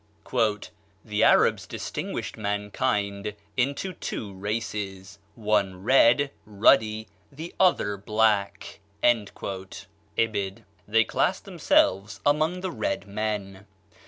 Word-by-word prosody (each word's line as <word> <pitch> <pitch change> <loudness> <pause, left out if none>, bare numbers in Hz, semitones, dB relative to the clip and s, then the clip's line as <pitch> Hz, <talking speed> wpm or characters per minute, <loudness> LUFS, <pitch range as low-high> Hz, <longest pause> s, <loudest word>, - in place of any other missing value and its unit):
"The - - 0
Arabs - - +4
distinguished - - -5
mankind 105 0 -2 0.2
into 140 +9 -1
two 105 - -5
races, 100 -1 -4 0.2
one 105 -4 0
red, 135 +3 +5
ruddy, 110 +1 +3 0.2
the 160 +5 -8
other 170 - +3
black." 100 -1 0 0.2
(Ibid.) 100 -1 -2 0.2
They 115 +2 +4
classed - - 0
themselves 100 +2 +2
among 155 +5 +2
the 185 -1 -3
red 295 - -2
men. 100 -1 -4
105 Hz, 90 wpm, -26 LUFS, 100-120 Hz, 0.2 s, red